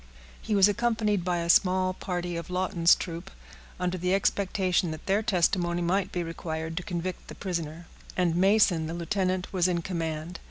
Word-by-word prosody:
He 215 - -1
was 195 0 +7
accompanied 215 -3 +1
by 175 0 0
a 170 - -3
small 185 +1 +4
party 175 -1 -4
of 170 +1 -5
Lawton's 180 -2 +3
troop, 170 -1 -6 0.5
under 180 0 -1
the 180 +2 +1
expectation 190 -2 +1
that 155 0 -7
their 200 +2 +2
testimony 175 -4 +1
might 190 +2 0
be 175 - -2
required 160 -1 -5
to - - 0
convict 180 -1 -4
the - - -9
prisoner; 170 -3 -4 0.3
and 175 -3 +2
Mason, 185 -3 +3
the 165 - -4
lieutenant, 185 +2 -1
was 180 -2 +3
in 170 -2 -1
command. 165 -1 -4
180 Hz, 170 wpm, -27 LUFS, 170-190 Hz, 0.5 s, was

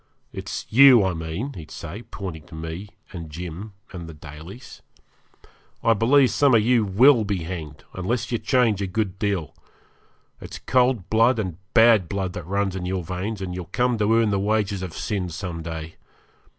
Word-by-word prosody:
It's - - -5
you, 125 -2 +8
I 95 -1 0
mean,' 80 - -4
he'd 80 -4 -10
say, 95 +9 -7
pointing 90 -9 -8
to 85 - -11
me 80 +5 -6 0.2
and 85 -3 -7
Jim 90 +6 -7 0.2
and 85 -3 -7
the 80 - -10
Dalys; 80 - -11 1.0
'I 115 - +5
believe 125 +5 +4
some 140 -4 +4
of 110 - +4
you 120 -2 +4
WILL 115 +5 +5
be 100 -5 -2
hanged 80 -4 -7
unless 115 +6 -2
you 120 - 0
change 120 -7 +2
a 100 - -1
good 95 0 -2
deal. 95 -9 -1 0.9
It's - - -8
cold 125 -6 +1
blood 115 +3 +4
and 95 -7 -3 0.2
bad 115 -6 +6
blood 95 -2 -2
that 90 -4 -7
runs 100 0 -1
in 90 -1 -4
your 95 -1 -2
veins, 95 +4 -4
and 90 -1 -4
you'll 90 -1 -5
come 120 +5 0
to 105 +1 +2
earn 115 -2 +3
the 100 - +1
wages 105 -1 0
of 90 -3 -6
sin 95 -5 -2
some 85 -1 -5
day. 80 -1 -7
95 Hz, 180 wpm, -23 LUFS, 85-115 Hz, 1.0 s, you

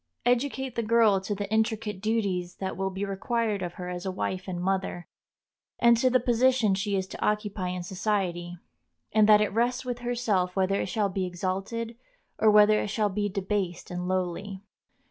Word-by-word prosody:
Educate 260 +1 0
the 235 - -1
girl 220 -3 +4
to 205 +2 -3
the 200 0 -4
intricate 220 -3 0
duties 195 -5 -1
that 190 -1 -4
will 195 +1 -1
be 195 +1 -3
required 210 +1 -1
of 175 -1 -4
her 180 - -7
as 180 0 -5
a 190 - -2
wife 185 0 -3
and 180 -2 -4
mother, 190 -1 -2 0.7
and 235 0 +6
to 255 +3 +3
the 255 0 +4
position 240 -2 +3
she 200 +1 -1
is 190 -1 0
to - - -7
occupy 210 -3 -1
in 180 0 -3
society, 180 -2 -2 0.5
and 215 0 +4
that 210 0 +7
it 210 - 0
rests 245 +3 0
with 245 -1 -3
herself 230 -7 0
whether 195 +1 +1
it - - -2
shall 205 0 0
be 190 -1 -2
exalted 195 +6 -3 0.4
or 220 - +5
whether 210 0 +6
it - - -2
shall 210 0 0
be 205 +1 -1
debased 190 -3 -3
and 180 0 -3
lowly. 185 +2 -3
200 Hz, 185 wpm, -27 LUFS, 185-225 Hz, 0.7 s, that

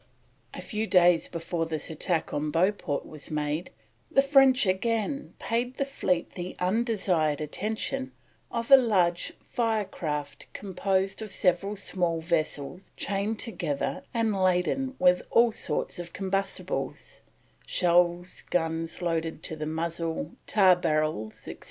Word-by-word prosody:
A - - -6
few 220 0 -2
days 175 -3 +4
before 165 -1 -2
this 155 -1 -4
attack 160 +1 -1
on 150 +1 -1
Beauport 165 -2 0
was 155 -2 -9
made, 150 +3 -2 0.4
the 275 - +4
French 270 -3 +5
again 225 +8 -1
paid 245 +2 -2
the 275 - +1
fleet 185 -11 -1
the 180 0 -6
undesired 185 - +1
attention 220 - -3 0.4
of 235 +2 -3
a 275 - +12
large 185 -9 +2
fire 220 -4 0
raft 150 -3 -3
composed 195 0 -1
of 215 - -5
several 195 +3 +1
small 175 -4 -1
vessels 160 0 -2
chained 205 +2 -1
together 165 - -2
and 225 -3 +1
laden 185 +9 +1
with 180 0 +4
all 235 0 +5
sorts 160 -4 -2
of 175 -1 -6
combustibles 195 0 -3 0.5
shells, 175 0 +2
guns 165 0 -1
loaded 165 -2 -1
to 160 - -3
the 155 0 -4
muzzle, 165 0 -3 0.2
tar 190 -4 +6
barrels, 155 - -1
etc. - - -7
180 Hz, 130 wpm, -28 LUFS, 165-215 Hz, 0.5 s, a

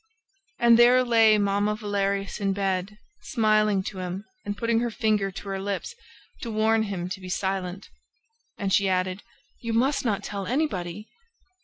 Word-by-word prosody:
And 235 -1 +5
there 250 +1 +6
lay 225 -3 +5
Mamma 205 +1 +1
Valerius 200 -2 -2
in 195 -1 0
bed, 195 +1 -2 0.2
smiling 215 -3 +2
to 190 0 -6
him 185 +2 -5 0.2
and 205 0 -4
putting 230 0 +1
her 240 0 0
finger 215 -3 0
to 195 +2 -9
her 195 0 -2
lips, 200 - -4 0.5
to 235 - -4
warn 220 0 +2
him 195 -5 -3
to 185 - -5
be 185 - -8
silent! 190 0 -3 0.7
And 195 -1 -1
she 200 -1 +3
added: 185 +1 -1 0.4
"You 230 -2 -3
must 275 +5 +2
not 215 -5 -1
tell 200 -2 -5
anybody!" 210 - -2
205 Hz, 160 wpm, -26 LUFS, 195-225 Hz, 0.7 s, there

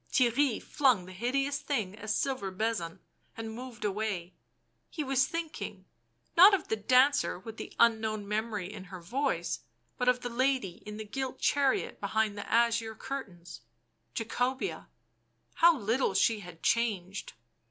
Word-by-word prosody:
Theirry 255 0 +3
flung 250 -10 +2
the 185 - -10
hideous 270 +8 0
thing 220 -10 -2
a 215 - -8
silver 255 -2 0
bezant 190 -4 -2 0.4
and 225 -1 -5
moved 240 -1 -7
away; 195 -4 -2 0.6
he 305 - -3
was 265 -1 +2
thinking, 310 - -5 0.5
not 390 +4 +9
of 370 - -6
the - - +2
dancer 255 +6 +3
with 220 +4 -9
the - - -7
unknown 220 -3 +2
memory 210 -2 -2
in 195 -3 -8
her 185 0 -9
voice, 180 -2 -1 0.4
but 250 0 +3
of 250 0 +2
the 245 - -3
lady 250 -6 0
in 210 0 -6
the 215 - -6
gilt 260 +4 -4
chariot 280 -2 +1
behind 215 +1 0
the 205 - -7
azure 230 -1 +2
curtains; 180 - -7 0.5
Jacobea 245 -6 -2 0.4
— 115 0 -41
how 335 -1 +7
little 225 -2 0
she 220 +2 +3
had 180 -4 -11
changed 200 -5 0
225 Hz, 150 wpm, -30 LUFS, 195-260 Hz, 0.6 s, not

